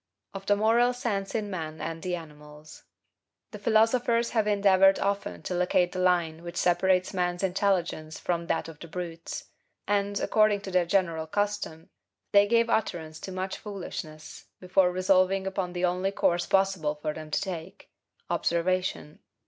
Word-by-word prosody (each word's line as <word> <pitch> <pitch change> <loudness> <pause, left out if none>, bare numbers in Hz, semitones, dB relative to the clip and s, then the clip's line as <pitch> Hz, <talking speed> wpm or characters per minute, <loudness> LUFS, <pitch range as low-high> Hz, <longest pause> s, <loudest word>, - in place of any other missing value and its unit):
% - - -40
1. 195 - -6
Of - - -23
the 205 - +4
Moral 230 +4 +3
Sense 210 -6 -3
in 210 -2 -2
Man 160 -3 -5
and 165 0 -5
the 180 -1 -2
Animals. 150 -2 -12 0.7
The 210 - -8
philosophers 230 +2 +2
have 220 -3 +1
endeavored 195 -2 +5
often 200 - -2
to - - -3
locate 180 0 +2
the 185 - -5
line 170 -3 +1
which 170 0 -8
separates 180 +2 +2
man's 180 0 -1
intelligence 180 -4 0
from 170 -1 -2
that 165 - -1
of 160 -2 -11
the 170 - -9
brutes; 170 -1 -6 0.4
and, 200 0 0
according 215 -2 +3
to 195 - -7
their 180 -2 +2
general 165 -4 0
custom, 205 -4 -3 0.4
they 200 0 +6
gave 230 +1 +3
utterance 160 -8 -2
to 190 - -7
much 190 +1 -4
foolishness 170 -6 -8
before 185 0 +2
resolving 185 +1 +2
upon 190 -2 -3
the 180 0 0
only 180 +2 0
course 175 -3 +1
possible 190 -6 +1
for 150 0 -3
them 155 0 -8
to - - 0
take, 180 -1 -7 0.4
observation. 170 -3 -1
185 Hz, 165 wpm, -27 LUFS, 170-200 Hz, 0.7 s, they